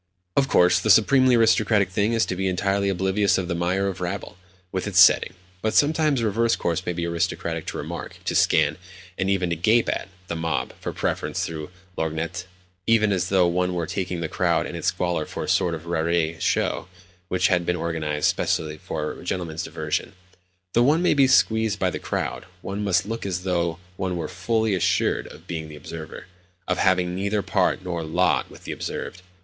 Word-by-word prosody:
Of 135 -1 +3
course, 90 -7 +4
the 110 - -2
supremely 130 +5 +6
aristocratic 110 -4 +3
thing 105 +4 +1
is 115 - +2
to 90 - -3
be 95 +1 -1
entirely 100 +2 0
oblivious 95 +2 +2
of 95 -2 -2
the 85 - -1
mire 90 +3 0
of 95 -2 -4
rabble, 90 +2 -4 0.4
with 95 +2 -3
its 95 -4 +2
setting; 90 - +6 0.3
but 110 - -1
sometimes 150 -3 +3
a - - 0
reverse 115 +2 +2
course 85 +1 -2
may 90 - 0
be 85 0 -3
aristocratic 85 -1 -2
to - - -4
remark, - - -6
to - - -1
scan, 80 +1 +3 0.4
and 95 +1 -1
even 95 -3 +1
to - - +1
gape 110 +8 +3
at, - - -2 0.2
the 85 - -3
mob 80 0 -2
(for - - -3
preference, - - -2
through 80 -1 -6 0.3
a - - -3
lorgnette), 80 +3 -3 0.4
even 110 -2 +4
as 90 -2 0
though 95 -2 +4
one 90 +1 0
were 85 -1 -1
taking 90 0 -3
the 80 - -1
crowd - - +1
and - - -6
its - - -3
squalor 90 -3 0
for - - -6
a - - -5
sort 85 -2 +2
of 80 +1 -10
raree 85 -1 0
show - - 0 0.4
which 90 0 +2
had 90 -2 +2
been 90 +1 0
organised 80 -3 -1
specially 75 0 -1
for - - -4
a - - -11
gentleman's 85 -3 -3
diversion. - - -3 0.6
Though 120 - +4
one 150 +7 +3
may - - +4
be 140 -2 +5
squeezed 110 -4 +3
by 95 -2 0
the - - -4
crowd, - - -3 0.2
one 100 +2 -4
must 95 -3 +2
look 115 +2 -4
as 90 -2 -3
though 85 -3 0 0.2
one 95 -2 -2
were 80 -2 -3
fully 110 +4 0
assured 90 - +1
of 80 +3 -13
being 80 -3 -5
the 75 - -9
observer—of 90 +4 -8
having 90 -1 +2
neither 100 +2 -1
part 95 - +1
nor 90 -2 -3
lot 80 -3 +1
with - - -14
the - - -5
observed. 90 - -5
90 Hz, 200 wpm, -24 LUFS, 85-100 Hz, 0.6 s, supremely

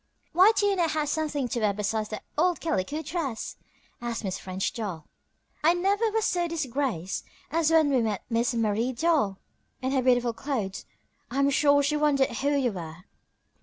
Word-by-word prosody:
"Why 370 +6 +7
do 410 - +2
you 400 -1 +3
not 345 -3 +1
have 305 -2 0
something 295 -4 -1
to 235 - -1
wear 210 -2 +2
besides 210 +1 -2
that 215 - -6
old 350 +3 +2
calico 310 - -2
dress?" 285 -8 -3 0.5
asked 235 -2 -3
Miss 190 -2 -3
French 190 0 -3
Doll. 195 -9 -5 0.6
"I 335 +3 +5
never 400 +5 +2
was 445 0 0
so 350 -1 +1
disgraced 265 - -2 0.3
as 320 0 +2
when 320 -3 +4
we 260 -3 +3
met 215 -4 -1
Miss 235 +2 0
Marie 225 +2 0
Doll 275 - +1 0.4
in 260 0 -2
her 270 -1 +2
beautiful 245 -2 +3
clothes. 225 -7 -3 0.4
I 260 - -5
am 275 0 +3
sure 285 0 +4
she 300 +2 +1
wondered 290 -3 +2
who 280 +1 0
you 275 -4 +2
were." 170 -2 -8
270 Hz, 180 wpm, -27 LUFS, 220-315 Hz, 0.6 s, Why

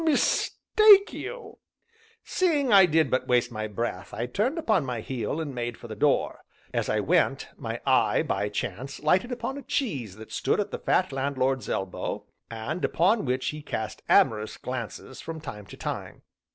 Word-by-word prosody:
mistake 400 +6 +4
you!" 465 -4 -7 0.6
Seeing 295 - +1
I 195 -2 +8
did 160 -3 +2
but 130 - 0
waste 120 0 +2
my 110 -1 -3
breath, 105 -3 -4
I 115 - -2
turned 215 - -1
upon 215 - +2
my 125 -3 -3
heel, 125 +4 -3
and 150 -4 -4
made 120 -2 -4
for 120 - -10
the 110 - -7
door. 140 +6 +1 0.3
As - - -1
I - - +2
went, - - +1
my - - -5
eye, - - +3
by 105 - -1
chance, 105 +6 -4
lighted 185 +11 +2
upon 245 +3 -3
a - - -8
cheese 195 - -2
that 110 +1 -12
stood - - 0
at 205 - -1
the - - -4
fat 185 -4 +1
landlord's 135 -3 -1
elbow, 95 -1 -3 0.2
and 115 +10 -4
upon 200 +4 +2
which 130 0 0
he 150 0 -6
cast 110 -7 -4
amorous 110 -1 +3
glances 125 +1 -6
from 165 -1 -6
time 105 -9 -8
to - - -11
time. - - -5
135 Hz, 175 wpm, -27 LUFS, -, 0.6 s, I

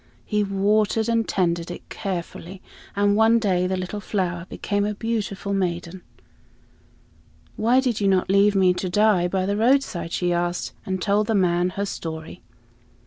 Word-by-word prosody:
He 210 -1 0
watered 210 +3 +1
and 230 -1 +1
tended 170 -2 0
it 175 - -8
carefully, 185 -1 -5 0.4
and 205 0 +2
one 220 +2 +5
day 185 -5 +1
the 190 0 -1
little 185 +3 -4
flower 180 -4 -3
became 205 -1 -2
a 210 0 -2
beautiful 205 -3 -3
maiden. 180 -1 -2 1.5
"Why 235 +4 +3
did 250 -5 -1
you 200 - +2
not 190 -1 +2
leave 200 +1 +4
me 185 -2 +4
to 185 +1 -3
die 205 -2 +3
by 185 +1 -1
the 200 +1 -1
roadside?" 230 -7 +1
she 175 0 0
asked, 175 0 -2
and 190 0 -2
told 205 +3 +1
the 225 - +1
old 205 - +3
man 175 0 +2
her 200 - 0
story. 160 -4 -6
195 Hz, 165 wpm, -23 LUFS, 180-210 Hz, 1.5 s, one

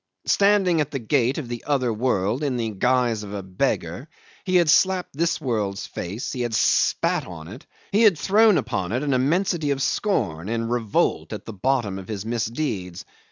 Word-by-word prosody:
Standing 195 -5 +3
at 150 - -2
the 145 - -3
gate 130 +1 +1
of 150 -6 -4
the 120 -1 -6
other 130 -5 +1
world 110 0 0
in 135 -4 -1
the 115 -2 -2
guise 120 +1 +1
of 105 -1 -7
a 100 - -5
beggar, 95 0 -2 0.4
he 185 -1 0
had 175 -2 +5
slapped 185 +1 +2
this 170 +3 0
world's 105 -8 -2
face, 100 +7 -5
he 125 - -3
had 120 -2 -1
spat - - +2
on 80 -3 -9
it, 100 - -11 0.2
he 210 - +3
had 210 -7 +5
thrown 210 +6 +4
upon 95 +2 -2
it 125 +4 -1
an 140 -2 0
immensity 155 +4 +1
of 140 -1 0
scorn 105 - -1
and 115 0 -2
revolt 115 -4 0
at - - -7
the 115 - -7
bottom 105 -2 -1
of 95 - -10
his 105 -2 -5
misdeeds. 115 - -3
125 Hz, 190 wpm, -23 LUFS, 105-150 Hz, 0.4 s, had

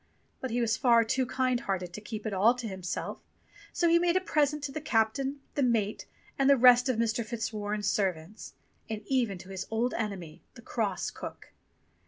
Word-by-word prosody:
But 260 - -4
he 240 +1 -1
was 230 -1 +1
far 235 -2 +5
too 255 +3 0
kind 255 -1 +1
hearted 185 -5 -3
to 210 - -7
keep 215 0 -7
it 215 - -2
all 215 +6 +4
to 245 -2 -5
himself; 190 -3 -4 0.5
so 345 - +1
he 335 0 +5
made 350 0 +2
a - - +5
present 300 -4 0
to 285 - -3
the 310 - -5
captain, 270 +3 0
the 285 - -1
mate, 225 -5 0 0.3
and 275 0 +4
the 280 - +6
rest 250 +1 +6
of 250 - +1
Mr. 230 0 0
Fitzwarren's 215 -2 -3
servants; 190 0 -2 0.3
and 215 -1 -4
even 240 -8 0
to 185 +2 -12
his 190 -1 -5
old 230 +3 0
enemy, 195 -8 -4
the - - -13
cross - - -2
cook. - - -9
230 Hz, 195 wpm, -29 LUFS, 210-260 Hz, 0.5 s, the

